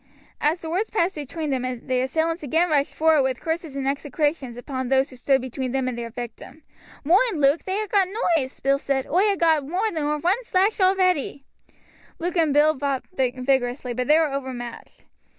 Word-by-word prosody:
As 315 Hz, +4 st, +1 dB
the 320 Hz, -, -6 dB
words 390 Hz, +6 st, -1 dB
passed 385 Hz, -3 st, +1 dB
between 300 Hz, +1 st, -4 dB
them 260 Hz, -2 st, 0 dB
the 255 Hz, 0 st, -2 dB
assailants 320 Hz, +6 st, -1 dB
again 320 Hz, +4 st, +1 dB
rushed 285 Hz, -2 st, +1 dB
forward 320 Hz, -2 st, +4 dB
with 260 Hz, -2 st, -1 dB
curses 320 Hz, -3 st, -4 dB
and 270 Hz, -1 st, -2 dB
execrations 285 Hz, -2 st, -1 dB
upon 260 Hz, 0 st, -4 dB
those 265 Hz, +2 st, +2 dB
who -, -, -11 dB
stood 265 Hz, +2 st, +2 dB
between 260 Hz, 0 st, -4 dB
them 265 Hz, -1 st, 0 dB
and 255 Hz, -, -2 dB
their 235 Hz, -1 st, -5 dB
victim. 240 Hz, +6 st, -9 dB, 0.4 s
"Moind, 375 Hz, -, +3 dB
Luke, 280 Hz, +3 st, +3 dB
they 380 Hz, +1 st, -1 dB
ha' 430 Hz, 0 st, -2 dB
got 395 Hz, -2 st, +3 dB
knoives!" 340 Hz, -, -1 dB
Bill 275 Hz, +1 st, +3 dB
exclaimed. 275 Hz, -1 st, -1 dB
"Oi 395 Hz, +5 st, +2 dB
ha' -, -, -12 dB
got 320 Hz, -4 st, +3 dB
more 385 Hz, +7 st, 0 dB
nor 300 Hz, -3 st, -1 dB
one 370 Hz, +11 st, 0 dB
slash 400 Hz, -1 st, +1 dB
already." 370 Hz, -7 st, +2 dB, 0.7 s
Luke 350 Hz, +1 st, -3 dB
and 325 Hz, -4 st, +3 dB
Bill 300 Hz, +2 st, +4 dB
fought 275 Hz, -1 st, -2 dB
vigorously, 255 Hz, -2 st, 0 dB
but 250 Hz, +1 st, -2 dB
they 300 Hz, -, +6 dB
were 315 Hz, -4 st, +1 dB
overmatched. 255 Hz, -3 st, -7 dB
290 Hz, 190 wpm, -24 LUFS, 265-335 Hz, 0.7 s, they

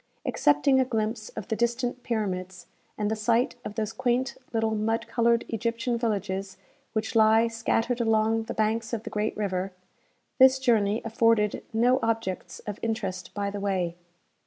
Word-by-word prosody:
Excepting 145 Hz, -, +3 dB
a -, -, +5 dB
glimpse 220 Hz, -2 st, -2 dB
of -, -, -5 dB
the 220 Hz, -, +1 dB
distant 240 Hz, +2 st, -1 dB
pyramids, 190 Hz, -6 st, -3 dB, 0.3 s
and 210 Hz, 0 st, -1 dB
the -, -, +1 dB
sight 230 Hz, +4 st, +1 dB
of 210 Hz, -, -6 dB
those 220 Hz, 0 st, -2 dB
quaint 255 Hz, +2 st, 0 dB, 0.2 s
little 225 Hz, -1 st, 0 dB
mud 220 Hz, +1 st, 0 dB
coloured 235 Hz, -1 st, +2 dB
Egyptian 230 Hz, +2 st, -1 dB
villages 195 Hz, -4 st, -2 dB, 0.4 s
which 220 Hz, 0 st, -2 dB
lie 220 Hz, +1 st, +5 dB
scattered 230 Hz, +1 st, 0 dB
along 225 Hz, 0 st, +2 dB
the -, -, -5 dB
banks 220 Hz, +1 st, 0 dB
of 225 Hz, -2 st, -2 dB
the -, -, -7 dB
great 210 Hz, +1 st, -1 dB
river, 190 Hz, -2 st, -2 dB, 0.7 s
this 260 Hz, 0 st, +7 dB
journey 225 Hz, -5 st, +2 dB
afforded 230 Hz, -2 st, +2 dB
no 245 Hz, +3 st, +3 dB
objects 225 Hz, -5 st, -2 dB
of 210 Hz, -1 st, -5 dB
interest 200 Hz, -5 st, -3 dB
by 200 Hz, -1 st, -1 dB
the 205 Hz, -, -5 dB
way. 185 Hz, -4 st, -1 dB
220 Hz, 160 wpm, -27 LUFS, 205-230 Hz, 0.7 s, this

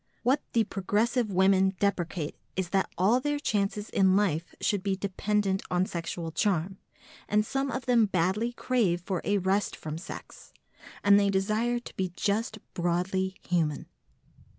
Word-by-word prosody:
What 265 Hz, +4 st, +3 dB
the 230 Hz, -, +4 dB
progressive 215 Hz, +4 st, 0 dB
women 190 Hz, +1 st, +3 dB
deprecate 175 Hz, -5 st, -1 dB, 0.2 s
is 185 Hz, -2 st, -2 dB
that 190 Hz, +1 st, +1 dB
all 210 Hz, +8 st, +4 dB
their 290 Hz, +2 st, -1 dB
chances 210 Hz, -5 st, -1 dB
in 190 Hz, -1 st, +4 dB
life 175 Hz, -5 st, 0 dB
should 205 Hz, -3 st, 0 dB
be 195 Hz, 0 st, 0 dB
dependent 195 Hz, 0 st, 0 dB
on 180 Hz, +1 st, +2 dB
sexual 170 Hz, -1 st, -4 dB
charm, 190 Hz, +1 st, 0 dB, 0.5 s
and 210 Hz, 0 st, +3 dB
some 270 Hz, +4 st, -1 dB
of 255 Hz, +1 st, -4 dB
them 235 Hz, -3 st, +4 dB
badly 190 Hz, +6 st, 0 dB
crave 220 Hz, -9 st, +1 dB
for 180 Hz, 0 st, -3 dB
a 205 Hz, -, +1 dB
rest 195 Hz, +2 st, 0 dB
from 155 Hz, +1 st, -6 dB
sex, 185 Hz, -, -10 dB, 0.5 s
and 200 Hz, 0 st, +7 dB
they 200 Hz, -1 st, +2 dB
desire 215 Hz, +5 st, +1 dB
to 240 Hz, -, -9 dB
be 185 Hz, -2 st, -2 dB
just 215 Hz, +3 st, -1 dB, 0.2 s
broadly 180 Hz, +2 st, 0 dB
human. 160 Hz, -4 st, 0 dB
195 Hz, 150 wpm, -28 LUFS, 180-215 Hz, 0.5 s, and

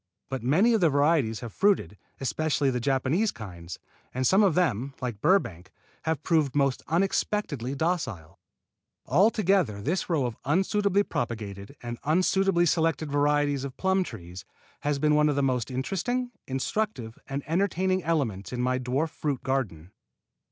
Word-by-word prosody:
But 135 Hz, -1 st, -3 dB
many 175 Hz, -, +3 dB
of 220 Hz, -, +2 dB
the 170 Hz, -, +5 dB
varieties 140 Hz, -6 st, +2 dB
have 115 Hz, -3 st, -7 dB
fruited, 195 Hz, -, +2 dB, 0.2 s
especially 140 Hz, +1 st, 0 dB
the 125 Hz, -, -1 dB
Japanese 140 Hz, -, +1 dB
kinds, 90 Hz, -5 st, -9 dB, 0.4 s
and 130 Hz, 0 st, 0 dB
some 190 Hz, +9 st, +5 dB
of 190 Hz, -6 st, +3 dB
them, 140 Hz, -, 0 dB
like 120 Hz, -5 st, -4 dB
Burbank, 95 Hz, -, +1 dB, 0.3 s
have 160 Hz, -2 st, -1 dB
proved 155 Hz, -6 st, +1 dB
most 140 Hz, -2 st, +1 dB
unexpectedly 165 Hz, -, 0 dB
docile. 130 Hz, -, -2 dB, 0.7 s
Altogether 190 Hz, -, +2 dB
this 165 Hz, -, -2 dB
row 155 Hz, -6 st, +1 dB
of 120 Hz, -2 st, -4 dB
unsuitably 195 Hz, -, +2 dB
propagated 105 Hz, -, -5 dB
and 120 Hz, 0 st, -5 dB
unsuitably 180 Hz, +3 st, +2 dB
selected 160 Hz, -3 st, +1 dB
varieties 145 Hz, -1 st, +2 dB
of 140 Hz, -2 st, -6 dB
plum 190 Hz, 0 st, +2 dB
trees 90 Hz, -, -9 dB, 0.4 s
has 145 Hz, -1 st, -1 dB
been 150 Hz, +2 st, +2 dB
one 150 Hz, 0 st, +4 dB
of 145 Hz, -, 0 dB
the 140 Hz, -, +1 dB
most 130 Hz, -2 st, 0 dB
interesting, 195 Hz, -, -2 dB, 0.2 s
instructive 135 Hz, -, -3 dB
and 135 Hz, +1 st, -3 dB
entertaining 185 Hz, +1 st, 0 dB
elements 130 Hz, -, -1 dB
in 125 Hz, -, -4 dB
my 130 Hz, +1 st, +1 dB
dwarf 130 Hz, +5 st, -1 dB
fruit 140 Hz, -4 st, -3 dB
garden. 105 Hz, -, -2 dB
145 Hz, 150 wpm, -27 LUFS, 125-175 Hz, 0.7 s, the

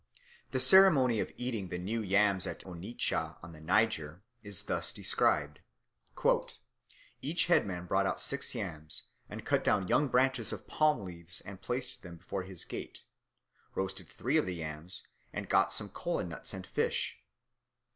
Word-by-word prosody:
The -, -, -1 dB
ceremony 145 Hz, -, +8 dB
of -, -, -2 dB
eating 120 Hz, -6 st, -3 dB
the 90 Hz, -, -4 dB
new 105 Hz, +6 st, -2 dB
yams 100 Hz, -1 st, +3 dB
at -, -, -5 dB
Onitsha, 85 Hz, -3 st, -2 dB
on 85 Hz, -, -9 dB
the 80 Hz, -, -13 dB
Niger, 90 Hz, -2 st, +1 dB, 0.2 s
is 100 Hz, -1 st, -3 dB
thus -, -, 0 dB
described: 75 Hz, -1 st, +1 dB, 1.6 s
"Each 165 Hz, +4 st, +2 dB
headman 95 Hz, -, +1 dB
brought 95 Hz, +2 st, +1 dB
out -, -, -2 dB
six 140 Hz, -1 st, 0 dB
yams, 80 Hz, -9 st, -5 dB, 0.3 s
and -, -, -8 dB
cut -, -, +2 dB
down 95 Hz, -3 st, +2 dB
young 145 Hz, +8 st, +3 dB
branches 130 Hz, -2 st, +2 dB
of -, -, -7 dB
palm 150 Hz, -9 st, +2 dB
leaves 85 Hz, -1 st, -4 dB
and 95 Hz, -1 st, -10 dB
placed 125 Hz, 0 st, -3 dB
them 90 Hz, -4 st, -10 dB
before 95 Hz, +3 st, -4 dB
his 90 Hz, -1 st, -5 dB
gate, -, -, -7 dB, 0.7 s
roasted 95 Hz, -2 st, -3 dB
three 135 Hz, +7 st, 0 dB
of 155 Hz, -, +1 dB
the 90 Hz, -, -2 dB
yams, 80 Hz, +2 st, -5 dB, 0.3 s
and -, -, -5 dB
got 95 Hz, -1 st, +3 dB
some 100 Hz, +1 st, -3 dB
kola 170 Hz, -, -2 dB
nuts 85 Hz, -3 st, -6 dB
and 95 Hz, -1 st, -7 dB
fish. -, -, -1 dB
95 Hz, 155 wpm, -32 LUFS, 90-125 Hz, 1.6 s, ceremony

